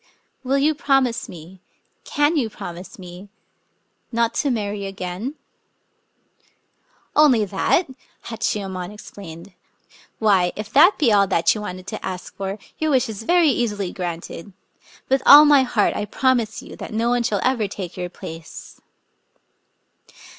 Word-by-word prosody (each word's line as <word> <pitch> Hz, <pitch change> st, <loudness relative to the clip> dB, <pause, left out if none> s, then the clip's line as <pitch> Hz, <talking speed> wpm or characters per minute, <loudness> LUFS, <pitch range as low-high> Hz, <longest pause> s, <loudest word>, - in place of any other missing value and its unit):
Will 265 Hz, +2 st, +1 dB
you 295 Hz, +3 st, +3 dB
promise 270 Hz, -5 st, +1 dB
me 175 Hz, +2 st, -12 dB, 0.2 s
— -, -, -45 dB
can 295 Hz, +3 st, +3 dB
you 255 Hz, -7 st, 0 dB
promise 175 Hz, -3 st, -9 dB
me 180 Hz, +1 st, -11 dB, 0.4 s
— -, -, -47 dB
not 230 Hz, -1 st, +2 dB
to 285 Hz, -, 0 dB
marry 205 Hz, -4 st, -2 dB
again?.. 195 Hz, +7 st, -5 dB, 0.6 s
." -, -, -44 dB
" -, -, -40 dB
Only 260 Hz, -8 st, +5 dB
that! 200 Hz, -, +1 dB, 0.2 s
" -, -, -32 dB
Hachiyemon 195 Hz, -5 st, -3 dB
exclaimed. 195 Hz, -3 st, -11 dB, 0.3 s
" -, -, -27 dB
Why, 195 Hz, -5 st, +2 dB
if 215 Hz, +1 st, -7 dB
that 340 Hz, +8 st, +6 dB
be 250 Hz, -9 st, +3 dB
all 200 Hz, -1 st, +4 dB
that 170 Hz, -3 st, +3 dB
you 215 Hz, -, -5 dB
wanted 185 Hz, -2 st, -7 dB
to -, -, -7 dB
ask 185 Hz, -1 st, -6 dB
for, 195 Hz, +1 st, -4 dB, 0.2 s
your 315 Hz, -, 0 dB
wish 260 Hz, -4 st, +2 dB
is 215 Hz, -1 st, -6 dB
very 345 Hz, +6 st, +4 dB
easily 205 Hz, -7 st, -1 dB
granted. 175 Hz, +1 st, -6 dB, 0.5 s
With 265 Hz, 0 st, +2 dB
all 295 Hz, +2 st, +10 dB
my 290 Hz, -2 st, +6 dB
heart 240 Hz, -5 st, +1 dB
I 210 Hz, -, -2 dB
promise 235 Hz, 0 st, 0 dB
you -, -, -11 dB
that -, -, -8 dB
no 230 Hz, +2 st, +1 dB
one 245 Hz, 0 st, +2 dB
shall 215 Hz, -4 st, 0 dB
ever 245 Hz, -5 st, +1 dB
take 190 Hz, -3 st, -7 dB
your 180 Hz, -1 st, -4 dB
place." 165 Hz, -2 st, -10 dB
210 Hz, 160 wpm, -22 LUFS, 185-260 Hz, 0.6 s, all